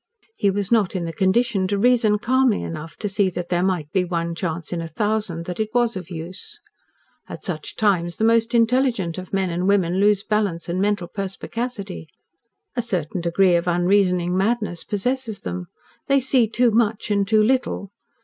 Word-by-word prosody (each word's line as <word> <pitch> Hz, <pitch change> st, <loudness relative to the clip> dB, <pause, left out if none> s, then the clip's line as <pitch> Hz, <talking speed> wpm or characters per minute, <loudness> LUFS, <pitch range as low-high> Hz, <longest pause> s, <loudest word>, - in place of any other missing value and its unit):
He 200 Hz, -, +3 dB
was 200 Hz, +1 st, -2 dB
not 215 Hz, -5 st, +2 dB
in 175 Hz, -2 st, -1 dB
the 165 Hz, -, -4 dB
condition 195 Hz, +2 st, +2 dB
to 200 Hz, +1 st, 0 dB
reason 230 Hz, -1 st, +3 dB
calmly 250 Hz, 0 st, +2 dB
enough 160 Hz, 0 st, -6 dB
to 210 Hz, -, -3 dB
see 195 Hz, -1 st, +1 dB
that 175 Hz, -1 st, -5 dB
there 175 Hz, -1 st, +1 dB
might 180 Hz, -5 st, -1 dB
be 190 Hz, -2 st, +2 dB
one 170 Hz, -1 st, -2 dB
chance 165 Hz, -1 st, -4 dB
in 170 Hz, -, -2 dB
a 165 Hz, -, -5 dB
thousand 210 Hz, -4 st, -1 dB
that 180 Hz, +2 st, -5 dB
it 215 Hz, 0 st, 0 dB
was 240 Hz, -2 st, +2 dB
of 185 Hz, -2 st, -6 dB
use. 170 Hz, +2 st, -7 dB, 0.7 s
At -, -, -8 dB
such 155 Hz, -5 st, -5 dB
times 175 Hz, -5 st, +1 dB
the -, -, -1 dB
most 230 Hz, +1 st, +3 dB
intelligent 230 Hz, -7 st, +2 dB
of 185 Hz, -, -9 dB
men 190 Hz, -2 st, 0 dB
and 180 Hz, +2 st, -1 dB
women 190 Hz, -2 st, +2 dB
lose 205 Hz, -1 st, +3 dB
balance 205 Hz, -6 st, -1 dB
and 180 Hz, +2 st, -1 dB
mental 205 Hz, -3 st, 0 dB
perspicacity. 200 Hz, -1 st, -5 dB, 0.7 s
A 245 Hz, -, +1 dB
certain 180 Hz, -6 st, -2 dB
degree 175 Hz, +1 st, +3 dB
of 170 Hz, +1 st, 0 dB
unreasoning 180 Hz, 0 st, +2 dB
madness 205 Hz, -3 st, 0 dB
possesses 225 Hz, +1 st, -2 dB
them. 90 Hz, 0 st, -5 dB, 0.4 s
They 275 Hz, 0 st, +4 dB
see 260 Hz, -3 st, +2 dB
too 235 Hz, +2 st, +2 dB
much 220 Hz, -1 st, +1 dB
and 200 Hz, -1 st, +2 dB
too 215 Hz, 0 st, +4 dB
little. 230 Hz, -5 st, 0 dB
195 Hz, 185 wpm, -22 LUFS, 175-220 Hz, 0.7 s, They